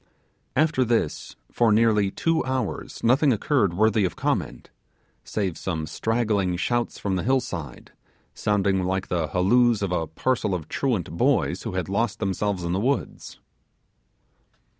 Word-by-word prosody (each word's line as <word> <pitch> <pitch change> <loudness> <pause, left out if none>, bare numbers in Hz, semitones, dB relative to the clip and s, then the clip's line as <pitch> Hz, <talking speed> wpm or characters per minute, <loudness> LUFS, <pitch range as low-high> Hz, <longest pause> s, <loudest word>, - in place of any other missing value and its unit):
After 150 -2 +3
this, 115 -10 -1 0.2
for 115 -2 +3
nearly 105 -2 +3
two 165 +10 0
hours 130 -1 -3
nothing 135 +5 +4
occurred 110 - +1
worthy 110 +1 +3
of 90 - -1
comment, - - -2 0.5
save 95 -6 -3
some 80 -4 -3
straggling 105 -1 0
shouts 120 +6 -1
from 95 -2 -2
the - - -1
hillside, 115 - -2 0.4
sounding 100 -2 +1
like 95 +1 -2
the 85 -3 0
halloos 110 +5 +3
of 95 - -1
a 85 -3 -1
parcel 105 - -1
of 80 -4 -6
truant 120 - -1
boys 85 - +1
who - - -5
had 95 -1 -2
lost 100 +3 -1
themselves 100 -2 -1
in 85 - -2
the 95 - 0
woods. 130 +4 -2
105 Hz, 140 wpm, -24 LUFS, 90-120 Hz, 0.5 s, nothing